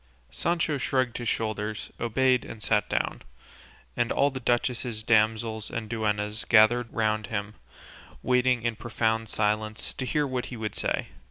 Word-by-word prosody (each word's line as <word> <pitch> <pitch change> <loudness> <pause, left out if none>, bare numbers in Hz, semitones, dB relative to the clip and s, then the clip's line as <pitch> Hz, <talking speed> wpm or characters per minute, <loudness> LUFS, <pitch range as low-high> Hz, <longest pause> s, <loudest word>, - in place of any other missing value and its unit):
Sancho 165 -3 0
shrugged 130 -2 0
his 120 -2 -1
shoulders, 110 -1 -2
obeyed, 125 +2 +2
and 110 -1 -9
sat 105 +1 +1
down, - - -1 0.7
and 120 - 0
all 140 +1 +3
the 130 - -5
duchess's 120 -2 -1
damsels 110 0 +2
and 115 -1 -4
duennas 105 -1 -1
gathered 115 +1 +5
round 110 -1 0
him, 105 -1 -3 0.7
waiting 125 -1 +2
in 115 -1 0
profound 110 0 -1
silence 110 0 -1
to 130 - -4
hear 150 +3 +1
what 130 -2 -3
he 125 - -7
would 110 -2 -3
say. - - -1
115 Hz, 150 wpm, -27 LUFS, 110-125 Hz, 0.7 s, gathered